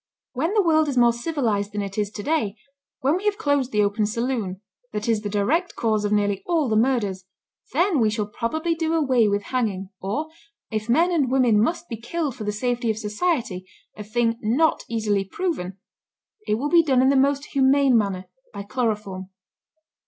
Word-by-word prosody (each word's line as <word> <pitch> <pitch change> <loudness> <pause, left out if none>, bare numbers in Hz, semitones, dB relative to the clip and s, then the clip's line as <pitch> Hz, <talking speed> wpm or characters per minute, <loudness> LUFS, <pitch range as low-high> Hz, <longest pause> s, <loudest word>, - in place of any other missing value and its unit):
When 295 +8 -1
the 415 - +4
world 315 -2 +3
is 275 -3 -2
more 240 -1 +5
civilized 235 -7 -1
than 205 -1 -2
it 195 0 -6
is 210 -2 -1
to 205 - -6
day, 290 -9 0 0.5
when 280 +6 +2
we 390 - -7
have 415 -1 +1
closed 285 - 0
the 210 -1 +3
open 205 +1 +1
saloon, 230 -4 -2 0.3
that 210 +1 -3
is 225 -2 +1
the 205 - -4
direct 260 - 0
cause 215 -2 0
of 205 - -1
nearly 205 -2 +1
all 330 -5 +1
the 220 - 0
murders, 215 -6 +1 0.5
then 345 +1 +2
we 220 -2 +3
shall 210 0 -1
probably 315 +11 -2
do 325 0 -1
away 260 -8 +3
with 205 0 0
hanging; 205 -7 -2
or, 285 +12 -3 0.4
if 215 +1 -3
men 335 +9 +3
and 295 -7 +1
women 245 -5 +4
must 335 +8 -1
be 230 - -5
killed 275 +4 -3
for 220 - -6
the 210 - 0
safety 240 +2 -1
of 220 - 0
society, 215 - -2 0.3
a 210 - -7
thing 230 +2 0
not 260 +9 +2
easily 210 -3 0
proven, 195 - -3 0.7
it 210 - +2
will 275 +6 -2
be 340 +1 +6
done 265 -5 +2
in 260 - +4
the 275 - +3
most 280 +2 +1
humane 270 -1 +4
manner, 195 -4 0 0.3
by 200 -1 -6
chloroform. 210 -5 -3
235 Hz, 195 wpm, -23 LUFS, 210-285 Hz, 0.7 s, be